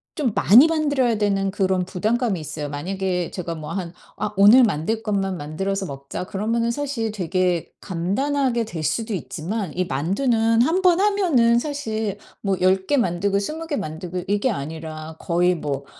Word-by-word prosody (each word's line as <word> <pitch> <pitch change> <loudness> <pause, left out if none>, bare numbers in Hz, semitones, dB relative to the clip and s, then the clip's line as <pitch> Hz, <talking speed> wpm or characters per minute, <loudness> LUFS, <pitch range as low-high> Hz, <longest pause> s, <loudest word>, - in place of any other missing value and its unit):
좀 280 -7 0
많이 245 +11 +7
만들어야 285 -8 +1
되는 195 -2 +1
그런 190 -2 0
부담감이 210 +1 0
있어요. 150 -1 -5
만약에 180 +4 -2
제가 170 -2 -4
뭐 155 0 -7
한 180 -3 -4 0.3
'아 205 - -2
오늘 210 +6 +8
만들 220 +2 0
것만 195 -3 -1
만들어서 190 +6 -3
먹자.' 140 +5 -6
그러면은 230 +5 -1
사실 260 -5 -2
되게 180 -3 -1
간단하게 235 +8 0
될 165 -8 -6
수도 220 - -1
있지만 185 +1 -4
이 185 - +1
만두는 225 - +1
1 335 +8 +1
번 360 0 +5
하면은 335 - +3
사실 220 -8 -3 0.2
뭐 195 -2 0
10 190 +1 +3
개 290 - +2
만들고 200 -2 +1
20 310 +11 -4
개 300 - -1
만들고 175 +2 -5
이게 205 +6 +1
아니라 155 -1 -6
거의 180 +1 +2
뭐 140 -4 -4
195 Hz, 310 characters per minute, -22 LUFS, 175-235 Hz, 0.3 s, 오늘